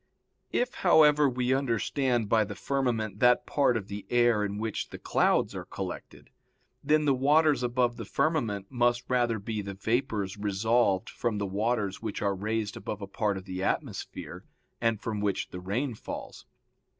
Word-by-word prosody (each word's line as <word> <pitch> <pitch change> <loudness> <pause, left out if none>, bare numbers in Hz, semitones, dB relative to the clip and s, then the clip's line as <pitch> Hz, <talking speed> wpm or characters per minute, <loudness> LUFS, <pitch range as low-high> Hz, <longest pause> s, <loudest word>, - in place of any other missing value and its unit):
If, 245 +1 0
however, 150 -5 +6
we 125 0 0
understand 125 -2 0
by 110 +1 +4
the 105 0 -6
firmament 115 -4 -1
that 125 0 +4
part 135 -5 +2
of 100 -3 -6
the 100 0 -7
air 120 -3 +3
in 100 0 -3
which 110 0 -3
the - - -8
clouds - - +1
are - - -6
collected, - - -7 0.5
then 150 +1 +3
the 140 - +4
waters 145 +3 +3
above 120 -1 +1
the - - -6
firmament 120 -10 -1
must 120 -1 +1
rather 120 -3 +1
be 105 +1 -4
the 100 -1 -6
vapors 110 -2 -1
resolved 100 0 +1
from 115 -3 -2
the 100 - -1
waters 100 0 -1
which 110 -2 -4
are 100 -1 +2
raised 105 +1 -2
above 105 +1 -5
a - - -2
part 100 0 -1
of 95 - -8
the 95 -1 -5
atmosphere, - - -3 0.4
and 115 -2 +1
from 105 -2 -3
which 100 -2 -1
the 90 - -7
rain 115 +9 -2
falls. 110 - -8
115 Hz, 170 wpm, -28 LUFS, 100-125 Hz, 0.5 s, however